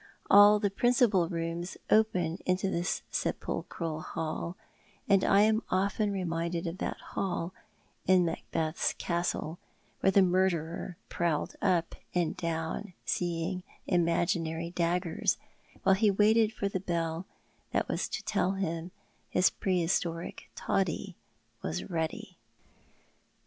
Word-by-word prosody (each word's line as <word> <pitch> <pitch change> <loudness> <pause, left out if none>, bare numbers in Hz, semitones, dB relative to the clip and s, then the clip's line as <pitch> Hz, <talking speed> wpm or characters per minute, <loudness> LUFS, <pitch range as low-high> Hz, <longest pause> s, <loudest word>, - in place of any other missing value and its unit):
All 205 +1 +9
the 205 -2 0
principal 215 -5 +3
rooms 170 +1 -3
open 185 -6 +3
into 185 +1 +1
this 175 0 -1
sepulchral 160 -2 -3
hall, 165 +2 -4 0.5
and 195 -2 +4
I 195 - +5
am 220 +1 +4
often 200 +2 +1
reminded 170 -2 -2
of 170 +2 -4
that - - -2 0.2
hall 175 -2 -2 0.5
in 185 -1 +5
Macbeth's 165 0 -1
castle, 170 -1 -2 0.4
where - - +3
the 195 0 +6
murderer 175 -2 0
prowled 165 -4 -1
up 175 -4 +2 0.2
and 175 -3 +1
down 165 +3 -3
seeing 175 +1 -1 0.2
imaginary 170 -1 +1
daggers, 175 0 0 0.5
while 195 - +5
he 210 +2 +4
waited 215 +2 +4
for 205 -2 -2
the 195 -1 -2
bell 170 -1 -2 0.4
that - - +1
was - - -1
to - - -4
tell 185 - +1
him 170 -3 -3 0.4
his 180 - +4
pre 185 -2 0
historic 165 0 -2
toddy 195 0 -1 0.5
was 180 +3 -4
ready. 160 -2 -3
180 Hz, 120 wpm, -30 LUFS, 165-195 Hz, 0.5 s, All